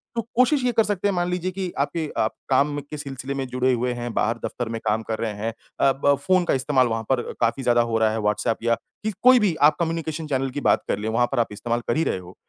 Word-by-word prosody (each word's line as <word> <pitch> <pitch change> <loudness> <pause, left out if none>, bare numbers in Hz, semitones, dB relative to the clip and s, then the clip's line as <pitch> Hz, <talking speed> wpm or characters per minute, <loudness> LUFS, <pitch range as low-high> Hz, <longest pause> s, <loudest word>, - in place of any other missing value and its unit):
तो 230 - +1
कोशिश 255 +3 +3
ये 245 - +3
कर 225 - +4
सकते 205 -2 -1
हैं, 200 - 0
मान 175 0 0
लीजिए 180 +1 -2
कि 185 -1 -4
आपके 155 +2 -1
आप 110 - +1 0.2
काम 145 +2 +2
के 145 +2 -9
सिलसिले 140 -2 -5
में 135 -1 -3
जुड़े 125 +1 +1
हुए 125 +1 0
हैं, 120 -1 -5
बाहर 115 +2 +1
दफ़्तर 120 -2 -4
में 115 0 -3
काम 110 +1 +1
कर 110 - -2
रहे 110 -2 -2
हैं 105 +3 -3 0.3
अ, 135 - +5
ब 140 0 +5
फ़ोन 185 -1 +4
का - - +1
इस्तेमाल 130 -1 +2
वहाँ 115 0 -2
पर 130 -2 +3
अ, - - -5
काफ़ी 115 +3 +1
ज़्यादा 120 -1 +4
हो 115 -1 0
रहा 110 -1 +3
है 110 - -2
व्हाट्सएप 105 +2 0
या 115 0 +3 0.3
कि 215 - 0
कोई 255 0 +8
भी 200 -7 +1
आप 150 +1 +6
कम्युनिकेशन 160 -1 -2
चैनल 135 -2 0
की 145 +2 -4
बात - - +3
कर - - 0
लें 110 - -2
वहाँ 120 +2 +2
पर 135 - 0
आप 115 - +2
इस्तेमाल 115 +3 -2
कर - - +1
ही 160 - +2
रहे - - 0
हो, 90 0 -13
135 Hz, 280 wpm, -23 LUFS, 115-165 Hz, 0.3 s, कोई